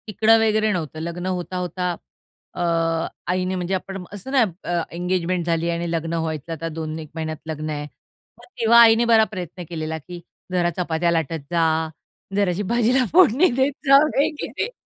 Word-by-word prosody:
तिकडा 220 Hz, +1 st, +4 dB
वगैरे 215 Hz, -1 st, +2 dB
नव्हतं 155 Hz, -3 st, -4 dB
लग्न 170 Hz, +2 st, -5 dB
होता 185 Hz, 0 st, -3 dB
होता 180 Hz, 0 st, -2 dB, 0.6 s
अ, -, -, -4 dB, 0.7 s
आईने 185 Hz, +1 st, -1 dB
म्हणजे 180 Hz, +1 st, -2 dB
आपण 190 Hz, 0 st, -4 dB
असतं 205 Hz, +6 st, -8 dB
ना. 265 Hz, -3 st, +5 dB, 0.5 s
एंगेजमेंट 180 Hz, 0 st, -1 dB
झाली 170 Hz, 0 st, 0 dB
आणि 170 Hz, 0 st, -2 dB
लग्न 165 Hz, 0 st, -2 dB
व्हायचं 160 Hz, -1 st, -3 dB
आता 165 Hz, +1 st, -5 dB
दोन 155 Hz, 0 st, -5 dB
एक 155 Hz, -2 st, -9 dB
महिन्यात 160 Hz, -1 st, -4 dB
लग्न 155 Hz, -1 st, -4 dB
आहे 150 Hz, -1 st, -3 dB, 0.5 s
मग -, -, -16 dB
तेव्हा 235 Hz, +1 st, +6 dB
आईने 230 Hz, 0 st, +6 dB
बरा 220 Hz, -1 st, +7 dB
प्रयत्न 180 Hz, -2 st, -6 dB
केलेला 160 Hz, -1 st, -4 dB
की, 175 Hz, +3 st, -10 dB, 0.3 s
"जरा 175 Hz, -1 st, +2 dB
चपात्या 170 Hz, -1 st, 0 dB
लाटत 165 Hz, -1 st, -1 dB
जा, 170 Hz, -1 st, +2 dB, 0.7 s
जराशी 200 Hz, -1 st, +1 dB
भाजीला 245 Hz, +2 st, +3 dB
फोडणी 350 Hz, -2 st, +6 dB
देत 275 Hz, +2 st, +2 dB
जा 275 Hz, 0 st, +8 dB
वगैरे." 300 Hz, -, -1 dB
180 Hz, 160 wpm, -22 LUFS, 165-215 Hz, 0.7 s, जा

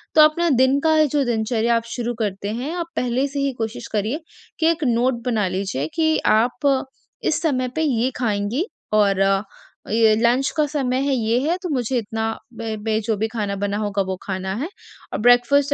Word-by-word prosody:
तो 310 Hz, -, +8 dB
अपना 325 Hz, +3 st, +4 dB
दिन 260 Hz, +1 st, +4 dB
का 315 Hz, 0 st, +4 dB
जो 290 Hz, 0 st, +1 dB
दिनचर्या 230 Hz, 0 st, +1 dB
आप 230 Hz, -, 0 dB
शुरू 240 Hz, -1 st, -2 dB
करते 200 Hz, -1 st, -2 dB
हैं, 260 Hz, +8 st, -3 dB
आप 345 Hz, -2 st, -2 dB
पहले 250 Hz, +2 st, 0 dB
से 280 Hz, 0 st, -4 dB
ही 275 Hz, 0 st, +1 dB
कोशिश 230 Hz, +1 st, -4 dB
करिए 220 Hz, +8 st, -1 dB, 0.4 s
कि 320 Hz, -, +3 dB
एक 320 Hz, -2 st, -3 dB
नोट 240 Hz, 0 st, +1 dB
बना 220 Hz, -6 st, +1 dB
लीजिए 185 Hz, -7 st, -2 dB
कि 315 Hz, -1 st, +2 dB, 0.2 s
आप 260 Hz, +4 st, +2 dB, 0.4 s
इस 310 Hz, -, +1 dB
समय 255 Hz, -6 st, 0 dB
पे 320 Hz, -, 0 dB
ये 260 Hz, -4 st, +1 dB
खाएँगी 225 Hz, -, -1 dB, 0.3 s
और 200 Hz, -2 st, +3 dB, 0.7 s
ये 220 Hz, -1 st, +4 dB
लंच 240 Hz, +4 st, +2 dB
का 305 Hz, -, +4 dB
समय 265 Hz, -4 st, -1 dB
है, 280 Hz, -, +1 dB
ये 230 Hz, 0 st, +1 dB
है 350 Hz, -, +1 dB
तो 360 Hz, -, -3 dB
मुझे 255 Hz, -2 st, 0 dB
इतना 220 Hz, 0 st, -2 dB, 0.3 s
बै 225 Hz, -1 st, -3 dB
बै, 220 Hz, +1 st, -1 dB
जो 220 Hz, 0 st, -1 dB
भी 220 Hz, -, 0 dB
खाना 210 Hz, -3 st, -3 dB
बना 205 Hz, 0 st, -1 dB
होगा 205 Hz, -2 st, -1 dB
वो 190 Hz, -, -1 dB
खाना 190 Hz, -1 st, -3 dB
है। 280 Hz, +8 st, -3 dB, 0.5 s
और -, -, -2 dB
ब्रेकफास्ट 245 Hz, +5 st, +4 dB
240 Hz, 195 wpm, -22 LUFS, 220-280 Hz, 0.7 s, तो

